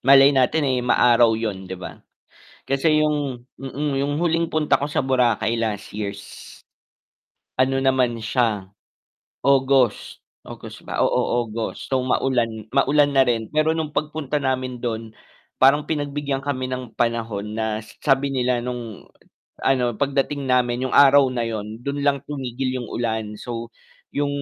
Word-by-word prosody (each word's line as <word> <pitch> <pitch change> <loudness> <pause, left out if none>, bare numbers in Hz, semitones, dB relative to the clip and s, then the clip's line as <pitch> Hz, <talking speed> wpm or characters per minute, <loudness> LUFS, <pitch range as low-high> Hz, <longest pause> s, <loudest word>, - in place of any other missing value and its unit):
malay 135 +2 +7
natin, 135 +3 +2
eh, 130 -2 +1
maaraw 120 -2 +4
'yun 100 -4 -4
'di 95 - -5
ba? 90 - -9 0.7
Kasi 155 +3 +2
'yung 145 -5 -1 0.2
mm, 135 +1 -3
'yung 145 +2 -2
huling 165 -1 0
punta 150 -3 +2
ko 140 - -3
sa 145 - -1
Boracay 120 -3 +1
last 105 -3 -3
years. 100 -1 -4 1.3
Ano 130 +1 +2
naman 130 -3 +2
siya, 110 -4 -1 0.7
August, 135 -4 +2 0.2
August - - -10
ba? - - 0
Oo 120 0 +1
August, 115 +3 -6
so 130 - +2
maulan 130 -1 +1 0.2
maulan 145 +1 +3
na 135 -2 +4
rin 115 -2 -1
pero 155 +1 +2
nung 160 -2 -3
pagpunta 150 -1 -2
namin 130 -2 -2
dun, 115 -2 -4 0.5
parang 140 +3 +5
pinagbigyan 145 -2 -2
kami 130 -2 -3
ng 125 -2 -6
panahon 115 -3 -2
na 110 0 -2 0.2
sabi 135 -1 +2
nila 125 -2 0
nung 120 -4 -6 0.6
ano, 125 -4 +1
pagdating 140 +2 -1
namin 125 -1 +1
'yung - - -8
araw 140 0 +7
na 125 - -2
'yun, 110 0 -5
dun 140 +2 -3
lang 140 -1 +2
tumigil 130 -2 -3
'yung 125 -2 -5
ulan. 110 -3 -2
So, 115 -1 -6 0.4
'yung 145 0 0
130 Hz, 145 wpm, -22 LUFS, 115-140 Hz, 1.3 s, malay